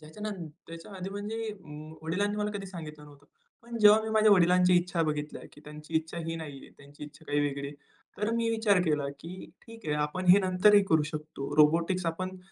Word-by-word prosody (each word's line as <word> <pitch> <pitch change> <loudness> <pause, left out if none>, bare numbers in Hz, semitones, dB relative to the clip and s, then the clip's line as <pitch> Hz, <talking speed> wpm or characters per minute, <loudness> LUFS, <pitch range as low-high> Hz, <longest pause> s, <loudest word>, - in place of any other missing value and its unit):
त्याच्या 155 +7 -12
नन 200 -6 -5 0.2
त्याच्या 165 +4 -10
आधी 185 +1 -6
म्हणजे 215 +3 -4 0.5
वडिलांनी 200 +6 -1
मला 210 0 -1
कधी 200 -1 -6
सांगितलं 155 -5 -9
नव्हतं. 145 -1 -17 0.4
पण 235 0 -7
जेव्हा 210 0 +7
मी 220 - -4
माझ्या 215 -1 +4
वडिलांच्या 180 -1 +5
इच्छा 175 -1 0
बघितल्या 150 -1 -3
की - - -16
त्यांची 150 +2 -11
इच्छा 160 +1 -3
ही 165 0 -3
नाही 150 -4 -7
आहे. - - -15
त्यांची 145 +1 -12
इच्छा 150 +2 -14
काही 145 0 0
वेगळी 140 -1 -2
आहे. 145 - -10 0.4
तर 210 +1 0
मी 230 0 0
विचार 220 -4 +2
केला 150 -4 0
की 180 +3 -9 0.2
ठीक 230 -1 -12
आहे 150 - 0
आपण 150 +5 -2
हे 185 +3 +9
नंतरही 195 +2 +5
करू 160 -2 +4
शकतो 150 -2 -6
रोबोटिक्स 165 +4 +3
आपण 185 +3 -3
175 Hz, 200 wpm, -29 LUFS, 150-205 Hz, 0.5 s, हे